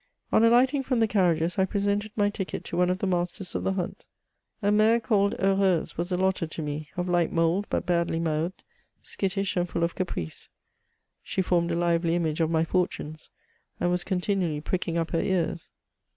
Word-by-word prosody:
On 220 - +4
alighting 250 +4 +4
from 255 -2 0
the 225 - +4
carriages, 175 -3 +1
I 190 - +4
presented 205 +2 -1
my 205 -1 +2
ticket 190 -2 -4
to - - -5
one 180 +1 +3
of 180 - +1
the 195 - -2
masters 180 +1 -2
of - - -2
the 190 - +1
hunt. 180 -2 -4 0.6
A 205 - +3
mare 215 +2 +4
called 205 -3 +1
Heureuse 195 -3 +2
was 175 +2 -3
allotted 185 -2 0
to 160 - -4
me 150 +1 -4
— - - -30
of 180 0 -1
light 175 -2 +2
mould, 165 +4 +1
but - - -1
badly 170 -2 +1
mouthed, 165 +2 -2 0.4
skittish 195 0 -2
and 175 -1 0
full 170 - -1
of 170 - 0
caprice; 85 - -5 0.7
she 190 - -2
formed 175 -1 +1
a 170 - 0
lively 170 0 +1
image 160 -2 0
of 160 - +2
my 160 -1 +2
fortunes, 160 -3 -2 0.5
and 175 - +1
was 180 0 0
continually 180 -4 -1
pricking 170 +2 -2
up 165 -1 -1
her 165 - +1
ears. 175 -3 -1
180 Hz, 195 wpm, -27 LUFS, 170-195 Hz, 0.7 s, On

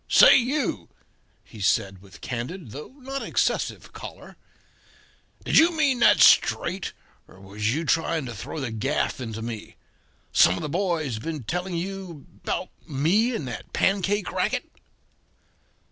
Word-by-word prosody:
"Say, - - +8
you," 245 - 0 0.5
he 110 - -13
said, 95 -1 +1
with 95 -1 -16
candid, 125 - -5
though 150 - -9
not 270 +1 -4
excessive, - - -1
choler, - - -10 1.1
"did - - +5
you 330 +2 +6
mean 280 -5 +2
that - - +5
straight, 180 +2 +4 0.3
or 95 - -17
was 105 +3 -2
you 165 +2 -2
trying 165 -1 +1
to 120 - -6
throw 115 +8 -6
the 130 -5 -3
gaff 130 +5 -1
into 110 -2 -5
me? 115 -2 -7 0.6
Some 90 - +6
of - - -5
the 150 - -3
boys 160 - -1
been 155 +1 -5
telling 180 - -3
you 180 -4 -5 0.2
about - - -2 0.2
me 185 - +2
and 145 - -4
that 125 - -8
pancake 200 +1 +1
racket?" - - -1
155 Hz, 145 wpm, -25 LUFS, -, 1.1 s, Say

